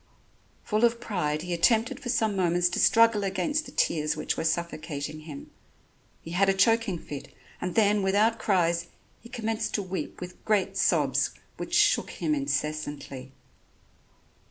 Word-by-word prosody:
Full 215 Hz, +1 st, 0 dB
of 235 Hz, 0 st, +3 dB
pride 155 Hz, -9 st, -2 dB
he 180 Hz, 0 st, -3 dB
attempted 230 Hz, +9 st, +2 dB
for 260 Hz, -4 st, -6 dB
some 220 Hz, -4 st, +1 dB
moments 175 Hz, -1 st, +2 dB
to 175 Hz, -, -2 dB
struggle 230 Hz, -2 st, +5 dB
against 195 Hz, -, -1 dB
the -, -, -10 dB
tears 150 Hz, -1 st, 0 dB
which -, -, -1 dB
were -, -, -3 dB
suffocating 155 Hz, -2 st, -3 dB
him. 155 Hz, -2 st, -10 dB, 0.7 s
He 165 Hz, -, -8 dB
had 195 Hz, +3 st, +3 dB
a 195 Hz, -, +3 dB
choking 225 Hz, -2 st, +2 dB
fit, 145 Hz, -3 st, -8 dB, 0.3 s
and 180 Hz, -1 st, -3 dB
then 210 Hz, -2 st, +3 dB
without 210 Hz, +4 st, +2 dB
cries 170 Hz, -4 st, +1 dB, 0.3 s
he 235 Hz, -, -14 dB
commenced 225 Hz, -2 st, -2 dB
to 205 Hz, -, -1 dB
weep 185 Hz, 0 st, -5 dB
with 180 Hz, 0 st, -9 dB
great 210 Hz, -3 st, +1 dB
sobs -, -, +2 dB, 0.3 s
which -, -, -3 dB
shook -, -, +3 dB
him 310 Hz, -, -2 dB
incessantly. 150 Hz, -, -3 dB
190 Hz, 155 wpm, -27 LUFS, 165-225 Hz, 0.7 s, struggle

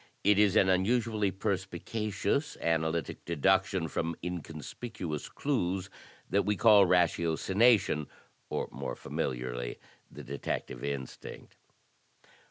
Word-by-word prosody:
It 105 Hz, 0 st, +5 dB
is 105 Hz, -3 st, +4 dB
an 95 Hz, -, +5 dB
unusually 105 Hz, +2 st, +2 dB
perspicacious 100 Hz, -, -2 dB
analytic 80 Hz, 0 st, -1 dB
deduction 95 Hz, +2 st, +2 dB
from 80 Hz, +1 st, -2 dB
inconspicuous 85 Hz, +1 st, -5 dB
clues 95 Hz, -9 st, -1 dB, 0.4 s
that 100 Hz, -, +2 dB
we 105 Hz, +1 st, 0 dB
call 100 Hz, -1 st, +6 dB
ratiocination, 90 Hz, -, +3 dB, 0.4 s
or -, -, -2 dB
more -, -, -5 dB
familiarly, -, -, -3 dB, 0.3 s
the -, -, -10 dB
detective 65 Hz, -2 st, -4 dB
instinct. 70 Hz, -2 st, -6 dB
95 Hz, 95 wpm, -30 LUFS, 80-105 Hz, 0.4 s, call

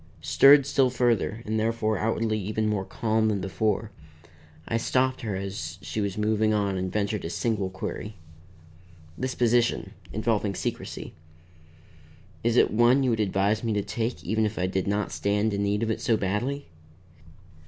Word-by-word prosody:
Stirred 135 Hz, -, +7 dB
still 135 Hz, -2 st, +3 dB
further 120 Hz, -2 st, 0 dB
and 110 Hz, +1 st, -1 dB
therefore 110 Hz, -2 st, 0 dB
outwardly 110 Hz, 0 st, 0 dB
even 105 Hz, +2 st, -1 dB
more 105 Hz, -3 st, -1 dB
calm 110 Hz, +1 st, 0 dB
than 105 Hz, -2 st, 0 dB
before, 105 Hz, +3 st, -1 dB, 0.8 s
I 115 Hz, -, 0 dB
stopped 130 Hz, +3 st, +1 dB
her 105 Hz, -4 st, -3 dB
as 95 Hz, -4 st, -5 dB
she 110 Hz, -, -3 dB
was 100 Hz, -1 st, -2 dB
moving 110 Hz, 0 st, +2 dB
on 100 Hz, -2 st, 0 dB
and 95 Hz, 0 st, -2 dB
ventured 105 Hz, 0 st, -1 dB
a 80 Hz, -, -3 dB
single 100 Hz, -1 st, -1 dB
query. 100 Hz, +3 st, -6 dB, 1.0 s
"This 130 Hz, +4 st, -3 dB
position 120 Hz, 0 st, +2 dB, 0.2 s
involving 110 Hz, -2 st, 0 dB
secrecy -, -, -5 dB, 1.3 s
is 120 Hz, +1 st, +2 dB
it -, -, +5 dB
one 120 Hz, +5 st, +4 dB
you 130 Hz, -, +2 dB
would 110 Hz, -, 0 dB
advise 100 Hz, +1 st, +1 dB
me 115 Hz, -2 st, 0 dB
to 105 Hz, -1 st, 0 dB
take, 115 Hz, +4 st, -3 dB
even 110 Hz, 0 st, 0 dB
if 105 Hz, 0 st, -1 dB
I 90 Hz, -, 0 dB
did 95 Hz, +1 st, -1 dB
not 105 Hz, +1 st, -1 dB
stand 105 Hz, +1 st, 0 dB
in 100 Hz, -, -1 dB
need 100 Hz, +2 st, 0 dB
of 115 Hz, -, 0 dB
it -, -, -3 dB
so 115 Hz, -3 st, +2 dB
badly?" 120 Hz, +9 st, -2 dB
110 Hz, 165 wpm, -26 LUFS, 100-115 Hz, 1.3 s, Stirred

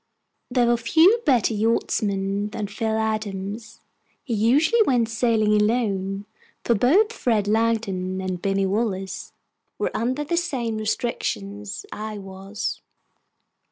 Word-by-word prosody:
There 245 Hz, -1 st, +2 dB
were 240 Hz, 0 st, +3 dB
few 325 Hz, -, +5 dB
better 240 Hz, -5 st, +3 dB
yachtsmen 205 Hz, -2 st, 0 dB
than 215 Hz, -1 st, -4 dB
Phil 220 Hz, +2 st, -2 dB
Adams. 215 Hz, 0 st, -3 dB, 0.4 s
He 250 Hz, -, -3 dB
usually 280 Hz, -, +3 dB
went 245 Hz, -, +2 dB
sailing 220 Hz, -2 st, +2 dB
alone, 200 Hz, -3 st, 0 dB, 0.4 s
for 235 Hz, -, +3 dB
both 355 Hz, -, +3 dB
Fred 220 Hz, -, 0 dB
Langdon 210 Hz, -4 st, 0 dB
and 185 Hz, -2 st, -3 dB
Binny 195 Hz, 0 st, +1 dB
Wallace 195 Hz, -2 st, -2 dB, 0.5 s
were -, -, -1 dB
under 255 Hz, +6 st, -1 dB
the 340 Hz, +4 st, -1 dB
same 250 Hz, -10 st, -1 dB
restrictions 105 Hz, -, -3 dB
I 215 Hz, 0 st, -5 dB
was. 195 Hz, +1 st, -5 dB
220 Hz, 120 wpm, -24 LUFS, 195-240 Hz, 0.5 s, few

